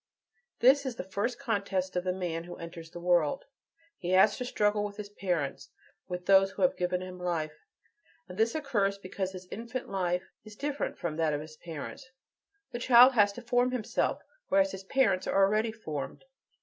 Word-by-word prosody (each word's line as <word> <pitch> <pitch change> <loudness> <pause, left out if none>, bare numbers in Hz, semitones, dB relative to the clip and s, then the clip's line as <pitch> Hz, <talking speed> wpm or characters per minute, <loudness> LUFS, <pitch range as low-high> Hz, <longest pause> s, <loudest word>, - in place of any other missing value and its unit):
This 270 +3 +6
is 260 -3 -4
the - - -5
first 200 +6 -2
contest 195 -5 -2
of 180 - 0
the 185 - 0
man 175 -3 -3
who 175 - -8
enters 170 -1 -9
the 175 - -9
world: 175 -4 +2 0.5
he 175 - -4
has 190 +3 +6
to 250 - -3
struggle 210 -3 +1
with 205 -1 -5
his 210 -1 -6
parents, 160 -9 -2 0.4
with 180 -1 -5
those 195 0 +6
who - - -3
have 270 - +4
given 180 0 -1
him 185 0 -8
life. 160 -4 -3 0.6
And 180 - -9
this 225 +5 +1
occurs 210 -10 0
because 190 -1 -4
his 185 0 -9
infant 235 +3 -5
life 180 -2 0 0.2
is 215 -1 -12
"different" 290 +4 -3
from 160 -3 -3
that 160 -2 +1
of 145 - -3
his 155 0 -10
parents; 165 - -8 0.6
the 240 - -4
child 250 +1 +7
has 205 -4 +5
to 245 - -9
form 245 +1 +2
himself, 250 -4 -1 0.2
whereas 290 0 +3
his 190 - -7
parents 195 -6 +2
are 195 0 +4
already 215 +3 +1
formed. 160 - -6
195 Hz, 190 wpm, -30 LUFS, 180-230 Hz, 0.6 s, child